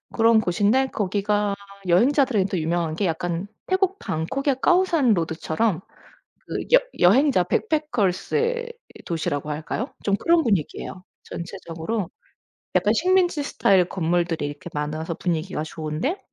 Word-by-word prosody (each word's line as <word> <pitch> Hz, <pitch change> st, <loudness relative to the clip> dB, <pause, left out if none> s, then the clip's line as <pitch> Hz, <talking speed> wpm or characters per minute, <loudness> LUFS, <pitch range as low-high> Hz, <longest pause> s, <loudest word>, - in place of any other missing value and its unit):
그런 225 Hz, -1 st, +5 dB
곳인데 215 Hz, +7 st, +2 dB
거기가 205 Hz, -1 st, 0 dB, 0.3 s
여행자들한테 210 Hz, -, +3 dB
유명한 165 Hz, 0 st, -1 dB
게 200 Hz, -, -1 dB
약간 170 Hz, +2 st, -2 dB, 0.2 s
태국 380 Hz, 0 st, +1 dB
방콕의 260 Hz, -, -1 dB
까오산 345 Hz, -9 st, +3 dB
로드처럼 165 Hz, +3 st, -1 dB, 0.7 s
그 -, -, -3 dB, 0.2 s
여 -, -, +9 dB, 0.2 s
여행자 220 Hz, +2 st, +5 dB
backpackers의 315 Hz, -, 0 dB, 0.3 s
도시라고 150 Hz, -3 st, -2 dB
할까요? 160 Hz, -, -4 dB
좀 200 Hz, -1 st, +2 dB
그런 335 Hz, +6 st, +3 dB
분위기에요. 185 Hz, -2 st, -2 dB, 0.2 s
전체적으로 170 Hz, +2 st, -5 dB, 0.7 s
약간 -, -, +3 dB
식민지 360 Hz, -5 st, +2 dB
스타일 190 Hz, -9 st, +3 dB
건물들이 170 Hz, -3 st, 0 dB
이렇게 145 Hz, +4 st, -8 dB
많아서 155 Hz, +3 st, -3 dB
분위기가 160 Hz, -3 st, -2 dB
좋은데 160 Hz, -, -3 dB
195 Hz, 345 characters per minute, -23 LUFS, 165-270 Hz, 0.7 s, 여